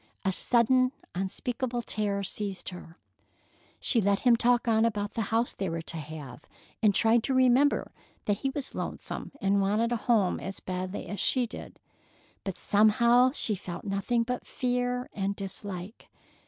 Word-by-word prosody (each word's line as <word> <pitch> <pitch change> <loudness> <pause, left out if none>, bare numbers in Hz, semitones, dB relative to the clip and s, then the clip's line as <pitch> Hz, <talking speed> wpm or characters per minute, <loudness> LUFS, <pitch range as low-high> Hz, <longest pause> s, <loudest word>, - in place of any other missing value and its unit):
A 190 - +3
sudden, 255 +5 +3 0.2
unspeakable 240 +6 -3
terror 205 -3 -1
seized 195 0 -3
her. 180 -1 -11 0.8
She 235 - +2
let 200 0 +2
him 245 -2 +5
talk 240 +1 +2
on 220 -1 +4
about 210 -3 0
the 230 - -1
house 230 +2 +1
they 195 -2 -3
were 165 0 -3
to 165 - -4
have, 150 -4 -8 0.4
and 210 -3 +4
tried 225 +1 +4
to 265 - 0
remember 260 +3 +3 0.3
that 205 -1 +1
he 270 - -1
was 270 0 -5
lonesome - - -5
and 195 0 +2
wanted 215 +4 +1
a 240 - +1
home 215 -5 +2
as 195 - -6
badly 185 +1 -4
as 205 - -5
she 255 +5 +2
did, 230 - -9 0.7
but 190 -3 -4
somehow 235 +4 +4
she 220 - +2
felt 175 -3 -6
nothing 205 +4 0
but 250 +1 -4
fear 250 0 -1
and 200 0 -2
dislike. 195 0 -6
215 Hz, 160 wpm, -28 LUFS, 195-245 Hz, 0.8 s, him